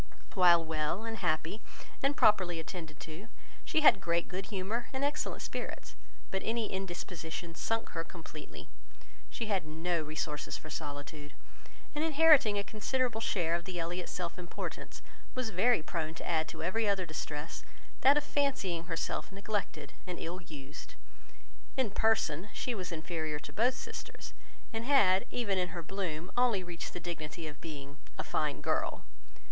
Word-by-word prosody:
While 175 -4 +7
well, 160 +5 0
and 225 0 -3
happy, 160 +6 0 0.4
and 275 +1 +2
properly 180 -5 +5
attended 160 -2 -6
to, 165 +7 -7 0.4
she 315 - +2
had 200 -10 +8
great 170 -2 +2
good 190 +1 -4
humour 215 +4 -1
and 265 0 -1
excellent 290 +1 0
spirits; - - -5 0.4
but 190 - 0
any 225 -1 0
indisposition 175 -3 -4
sunk 225 +6 -1
her 165 - -2
completely. 160 -3 -9 0.6
She 230 - -3
had 200 -5 +1
no 165 +2 0
resources 150 -1 -2
for 155 - -10
solitude; 145 +1 -5 0.6
and 300 +1 0
inheriting 305 -9 +7
a 200 - +1
considerable 230 +2 0
share 175 -7 +1
of 170 0 0
the 180 -1 -3
Elliot 175 +2 -2
self 180 0 -3
importance, 175 -1 -6 0.3
was 255 -3 -1
very 200 0 +4
prone 160 -2 -2
to - - -6
add 160 -2 +2
to - - -6
every 210 +5 +2
other 195 -2 +2
distress 155 -1 -4 0.4
that 275 +2 +7
of 295 - +3
fancying 230 - +1
herself 165 +3 -2
neglected 195 -7 -3
and 180 -1 -3
ill 175 +3 -4
used. 150 -3 -9 0.8
In 255 -6 +2
person, 205 -5 +2
she 250 - -1
was 185 -5 -4
inferior 160 -2 -2
to 150 - -9
both 245 +4 +3
sisters, - - -7 0.4
and 225 0 -1
had, 205 -9 +5
even 200 -6 +1
in 180 - +2
her 170 -1 -5
bloom, 180 -2 -3
only 240 -6 +4
reached 175 -1 -5
the - - -3
dignity 165 -1 -5
of 150 -1 -9
being 145 -3 -7 0.2
"a - - -1
fine - - 0
girl." - - 0
180 Hz, 160 wpm, -33 LUFS, 160-220 Hz, 0.8 s, had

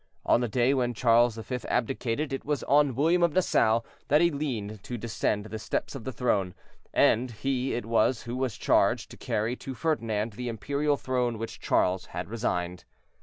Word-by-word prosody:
On 120 - +4
the 120 - 0
day 120 +4 +2
when 125 -3 0
Charles 120 0 +4
V. 125 +3 -4
abdicated, 130 +3 -1
it 135 - -3
was 145 -1 -1
on 145 -2 +3
William 165 +6 +3
of 170 -3 +3
Nassau 115 -11 +3 0.3
that 150 - +4
he 170 +1 +4
leaned 115 -9 -4
to 120 +4 -5
descend 110 -2 -1
the 110 0 -6
steps - - -3
of 135 -5 -8
the 130 - -3
throne, 100 -8 0 0.4
and 125 +3 +3
he 130 +3 -2
it 120 - -3
was 115 +1 +2
who 120 +1 -5
was 130 -3 -2
charged - - +2
to - - -9
carry 110 +4 -1
to 135 - -7
Ferdinand 115 -8 -1
the 125 +3 -4
imperial 140 +6 0
throne 125 -3 -1
which 115 +1 -6
Charles 90 0 +1
had 90 +3 -6
resigned. 90 -6 -2
120 Hz, 185 wpm, -28 LUFS, 110-135 Hz, 0.4 s, On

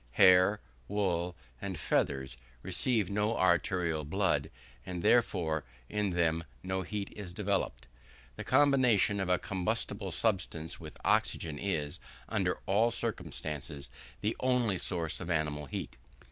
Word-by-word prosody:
Hair, 95 +2 +6 0.3
wool, 90 -4 0 0.3
and 95 -3 -4
feathers, 65 -3 0 0.3
receive 115 -7 +1
no 105 +3 +1
arterial 85 -2 +2
blood, 80 -2 +1 0.3
and, 90 +2 -5
therefore, 85 -10 +2 0.3
in 105 -1 0
them 85 -2 +1 0.2
no 95 0 -1
heat 100 +2 -4
is 90 -4 -7
developed. 100 - -1 0.5
The - - -6
combination 130 -7 +4
of 95 -1 -1
a 90 - +4
combustible 100 +2 -2
substance 90 -4 -1
with - - -9
oxygen 75 -3 +1
is, 75 -7 -2 0.3
under - - 0
all 110 +5 +3
circumstances, 75 - -4 0.3
the 105 +2 0
only 125 -7 +2
source 85 -2 +1
of 85 - -6
animal 75 -3 -1
heat. - - -5
95 Hz, 125 wpm, -32 LUFS, 80-105 Hz, 0.5 s, Hair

